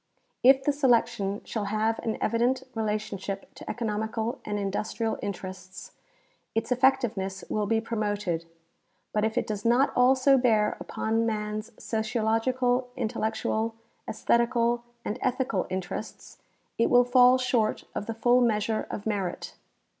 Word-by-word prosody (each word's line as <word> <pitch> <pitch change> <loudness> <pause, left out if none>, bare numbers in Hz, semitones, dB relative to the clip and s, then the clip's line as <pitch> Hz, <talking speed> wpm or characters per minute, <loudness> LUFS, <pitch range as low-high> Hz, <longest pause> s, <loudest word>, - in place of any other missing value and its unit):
K 265 +2 +7
the 290 - +3
selection 235 -7 +1
shall 215 -3 -3
have 215 +2 0
an 225 - -2
evident 245 +3 +1
relationship 210 -3 -3
to - - -10
economical 220 0 -2
and 210 0 -3
industrial 210 +3 -2
interests, 185 -1 -7 0.6
its 225 +2 -1
effectiveness 240 -7 +1
will 210 -1 0
be 225 +1 +2
promoted; 205 -7 -2 0.7
but 210 - +1
if 220 0 -1
it - - +1
does 210 -1 -4
not 240 +4 +3
also 260 +2 +5
bear 220 -4 +2
upon 225 +1 -1
man's 215 0 -3
sociological, 240 +3 0
intellectual, 225 -1 -1 0.3
esthetical. 235 0 +1 0.2
and 215 +4 -3
ethical 255 -6 0
interests, 185 -1 -6 0.4
it 230 - +3
will 245 0 +6
fall 250 0 +6
short 245 -4 0
of 210 - -4
the 225 - -3
full 240 +2 +4
measure 220 -2 +1
of 205 - -6
merit. 200 -5 -3
225 Hz, 130 wpm, -27 LUFS, 210-245 Hz, 0.7 s, K